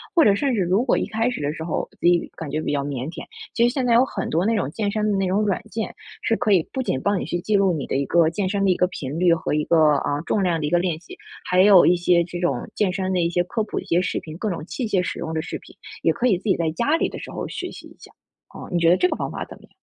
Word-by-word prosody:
或 335 - +6
者 200 -1 +5
甚 275 +3 0
至 210 - +1
如 185 +7 +2
果 255 - +2
一 - - 0
开 225 +3 0
始 250 - -4
的 145 0 -1
时 160 - -6
候， 160 - -2
自 - - +2
己 175 -1 +3
感 160 -3 -6
觉 155 +2 -2
比 - - -2
较 140 -1 0
腼 135 -1 -4
腆。 - - -8 0.3
其 235 0 +3
实 245 - -1
现 260 -3 -1
在 235 - +3
有 250 +3 +5
很 195 -7 -4
多 170 +5 +1
那 225 0 +2
种 185 -9 -1
健 205 +1 -2
身 215 0 0
的 200 - +1
那 195 - 0
种 195 +3 +1
软 200 -3 0
件， 220 -1 -4 0.3
是 225 - +1
可 215 - 0
以 180 -5 +3
不 265 - -2
仅 130 - -1
帮 200 -2 +1
你 - - -4
去 175 - -2
记 210 +4 0
录 195 -3 +3
你 145 -4 -4
的 - - -2
一 140 0 0
个 170 +1 +3
健 185 +3 -2
身 200 +1 -1
的 195 - +3
一 180 - +3
个 180 - +3
频 145 -3 -6
率 175 -2 +5
和 160 - -2
一 150 0 +1
个， 155 -3 +4
啊， 145 +1 -2
重 200 - 0
量 170 -3 +1
的 150 - -2
一 - - -1
个 175 - +3
练 175 -3 -1
习， 175 - -13 0.3
还 180 +1 +3
有 195 -3 +7
一 180 - +5
些 175 0 +3
这 175 +1 -6
种 175 +3 -1
健 200 -3 +1
身 190 0 -2
的 180 - +1
一 170 - +1
些 175 +1 +1
科 225 +3 -2
普 210 - -6
的 - - -7
一 - - -19
些 170 +2 +2
视 180 - -2
频， 155 0 -9
各 215 - -2
种 165 -4 -4
器 240 +5 -4
械 195 -3 +1
使 180 - -4
用 160 - -4
的 160 - -1
视 - - -5
频， - - -17 0.3
也 - - +3
可 235 +2 0
以 195 -7 +3
自 - - -15
己 195 - +3
在 165 -2 0
家 260 - +1
里 - - 0
的 - - -8
时 - - -8
候 - - -5
学 - - -5
习 - - -11
一 - - -17
下， - - -15 0.4
啊， - - -10
你 175 - +1
觉 165 -1 +4
得 180 - +5
这 360 - +3
个 - - -1
方 - - -4
法 - - -5
怎 - - -12
么 - - -21
样？ - - -18
180 Hz, 365 characters per minute, -23 LUFS, 165-210 Hz, 0.4 s, 有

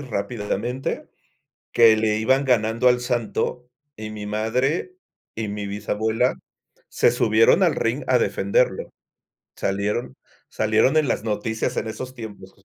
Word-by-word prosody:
rápidamente, 120 +1 -3 0.6
que 115 -2 +6
le 110 -1 +1
iban 130 +5 +2
ganando 115 0 +3
al 125 0 +3
Santo, 120 0 -2 0.3
y 110 0 -7
mi 105 -1 -7
madre 125 - -1 0.4
y 110 -1 -4
mi 100 0 -4
bisabuela 110 +4 0 0.5
se - - +3
subieron 475 +1 +4
al - - +4
ring - - -1
a - - +4
defenderlo. - - 0 0.7
Salieron 100 +5 -2 0.3
salieron 110 +7 +2
en 155 -2 +3
las 110 - -1
noticias 110 0 -2
en 110 - -1
esos 125 +4 -6
tiempos 105 -5 -10
110 Hz, 130 wpm, -23 LUFS, 105-125 Hz, 0.7 s, que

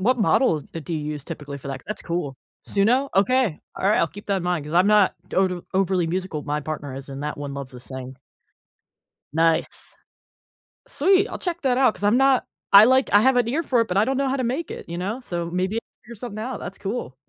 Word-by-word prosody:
What 245 +5 +2
models, 180 - +2
uh, 165 - -4
do 165 - -7
you 155 - -2
use 145 -2 -7
typically 145 -4 -7
for 140 - -9
that? 135 -1 -4
'Cause - - -16
that's 215 - -5
cool. 165 -6 -3 0.3
Suno? 245 +7 +2
Okay. 220 -3 +2 0.2
Alright, 200 +3 +2
I'll - - +3
keep 205 - -12
that 200 -1 +1
in - - -6
mind, 175 -4 -1
'cause 150 +3 -6
I'm 180 +3 +5
not 210 -2 +4
total 180 -2 0
overly 190 -2 +2
musical, 180 -3 -3
my 150 0 -2
partner 145 -2 -5
is, 135 +1 -8
and 135 +1 -7
that 150 0 -3
one 145 -1 -6
loves 140 -2 -7
to 125 - -10
sing. 130 0 -8 1.2
Nice. 165 +1 0 0.9
Sweet. 390 - +3
I'll - - -6
check 345 -2 -3
that 255 -2 +2
out, 255 -5 +4
'cause 205 - -7
I'm 210 +3 +4
not 270 -1 +4 0.3
I 200 +2 +10
like 260 +2 +4
I 205 - +6
have 260 +1 +4
an 240 -2 +2
ear 310 +7 0
for 250 -6 +2
it, 230 - 0
but 180 - -2
I 205 - +5
don't 265 +2 -1
know 275 0 +1
how 270 - 0
to 255 - -1
make 265 +8 -2
it, - - -8
you 170 +1 -5
know? 210 +8 -3
So 170 -7 -4
maybe 185 +5 -1 0.3
figure 235 +2 -10
something 215 -1 -7
out. 245 +4 -4
That's 195 - -7
cool. 200 - -4
195 Hz, 240 wpm, -23 LUFS, 155-245 Hz, 1.2 s, I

